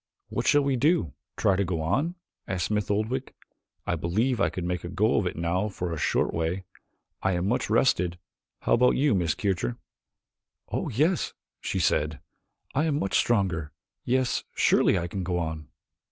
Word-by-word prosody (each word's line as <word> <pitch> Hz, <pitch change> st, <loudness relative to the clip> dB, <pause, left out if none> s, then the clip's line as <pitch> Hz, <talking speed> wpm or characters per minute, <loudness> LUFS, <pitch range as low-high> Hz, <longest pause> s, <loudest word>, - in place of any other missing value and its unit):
"What -, -, -2 dB
shall 145 Hz, 0 st, +5 dB
we 140 Hz, -2 st, +1 dB
do 140 Hz, -, +2 dB, 0.2 s
try 100 Hz, -, +3 dB
to 100 Hz, -, +1 dB
go 90 Hz, -3 st, -2 dB
on?" 135 Hz, -, 0 dB, 0.3 s
asked 90 Hz, -2 st, -1 dB
Smith 105 Hz, -1 st, -1 dB
Oldwick. 110 Hz, +6 st, -1 dB, 0.5 s
"I -, -, 0 dB
believe 105 Hz, +9 st, 0 dB
I -, -, +3 dB
could 90 Hz, -, -5 dB
make 90 Hz, 0 st, -2 dB
a 85 Hz, -, -5 dB
go 105 Hz, +5 st, +2 dB
of 95 Hz, -, 0 dB
it -, -, -3 dB
now 85 Hz, +5 st, 0 dB
for 90 Hz, -3 st, -4 dB
a -, -, -3 dB
short -, -, +1 dB
way. 85 Hz, +3 st, -1 dB, 0.6 s
I 95 Hz, -, +1 dB
am 90 Hz, +1 st, 0 dB
much 120 Hz, -, 0 dB
rested. 90 Hz, -8 st, +2 dB, 0.4 s
How -, -, +2 dB
about 125 Hz, +2 st, +5 dB
you 140 Hz, -2 st, +3 dB
Miss 85 Hz, -5 st, +1 dB
Kircher?" 90 Hz, -, -1 dB, 0.9 s
"Oh, -, -, -2 dB
yes," 155 Hz, -, +1 dB, 0.3 s
she -, -, -3 dB
said, 75 Hz, -1 st, +1 dB, 0.5 s
"I 150 Hz, +4 st, +2 dB
am 150 Hz, -3 st, +1 dB
much 95 Hz, -8 st, -1 dB
stronger. 90 Hz, -, +1 dB, 0.3 s
Yes, 130 Hz, 0 st, +1 dB
surely -, -, +4 dB
I 85 Hz, -, -1 dB
can 95 Hz, +3 st, -4 dB
go 90 Hz, 0 st, -1 dB
on." 80 Hz, -3 st, -3 dB
95 Hz, 180 wpm, -27 LUFS, 85-120 Hz, 0.9 s, shall